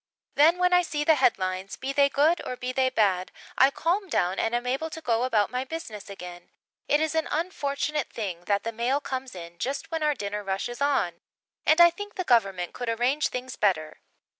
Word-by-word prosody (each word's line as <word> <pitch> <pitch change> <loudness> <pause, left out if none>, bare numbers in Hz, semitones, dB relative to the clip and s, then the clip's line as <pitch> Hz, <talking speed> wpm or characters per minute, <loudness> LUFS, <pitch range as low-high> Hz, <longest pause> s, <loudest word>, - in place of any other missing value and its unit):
Then 320 +5 +5
when 360 0 +2
I 360 - +6
see 300 -4 -2
the 320 - +5
headlines, 190 -8 0
be 270 +1 -4
they 280 0 +4
good 305 +5 +2
or 255 - -4
be 250 +1 -3
they 260 0 +2
bad, 195 -7 +1 0.2
I 265 - +6
calm 360 +7 -1
down 180 - 0
and 225 +1 0
am 240 +1 -2
able 270 +6 -1
to 320 - -7
go 240 -5 0
about 220 -5 +1
my 250 +1 -1
business 255 -9 -7
again. 180 -3 -9 0.4
It 295 - +3
is 315 0 0
an 320 0 0
unfortunate 300 -3 -2
thing 180 -6 -5
that 200 +1 +1
the 230 - -3
mail 240 +5 0
comes 260 -5 -5
in 170 -1 -10
just 280 +6 -3
when 325 -1 -2
our 300 -1 +2
dinner 205 -1 -4
rush 195 +3 -2
is 240 +3 -8
on, 180 -12 0 0.5
and 315 - +5
I 345 0 +8
think 410 +4 -8
the 370 - -2
Government 195 - +1
could 245 -2 -4
arrange 245 +6 +1
things 255 0 -6
better. 155 -7 0
255 Hz, 215 wpm, -26 LUFS, 205-300 Hz, 0.5 s, I